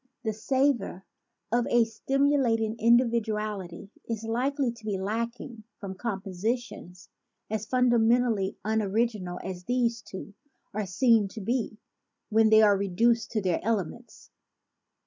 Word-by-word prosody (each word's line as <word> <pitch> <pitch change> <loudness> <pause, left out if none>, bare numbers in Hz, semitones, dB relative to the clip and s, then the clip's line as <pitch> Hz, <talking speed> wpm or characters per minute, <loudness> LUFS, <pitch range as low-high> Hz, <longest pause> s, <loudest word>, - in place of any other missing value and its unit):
The 220 -2 -1
savor 240 -4 0 0.5
of 240 +1 +2
a 240 -1 +4
stimulating 230 -1 +1
indi 235 +2 +5
viduality 210 -5 -3 0.2
is 225 -1 -3
likely 255 +3 0
to 230 -1 -15
be 210 -2 -2
lacking 230 +3 -4
from 195 -2 -6
composi 195 +1 -2
tions 180 -7 -12 0.4
as 220 0 -2
fundamentally 240 -4 +2
unoriginal 215 -3 -1
as 180 -1 -6
these 240 -2 0
two 200 0 -9 0.4
are 210 -1 -2
seen 225 +2 +3
to 210 +3 -9
be 225 0 -2 0.5
when 220 0 +4
they 220 0 +7
are 205 -1 +6
reduced 220 +4 +1
to 215 -3 0
their 180 -3 +1
elements. 225 +2 -4
220 Hz, 125 wpm, -27 LUFS, 200-240 Hz, 0.5 s, they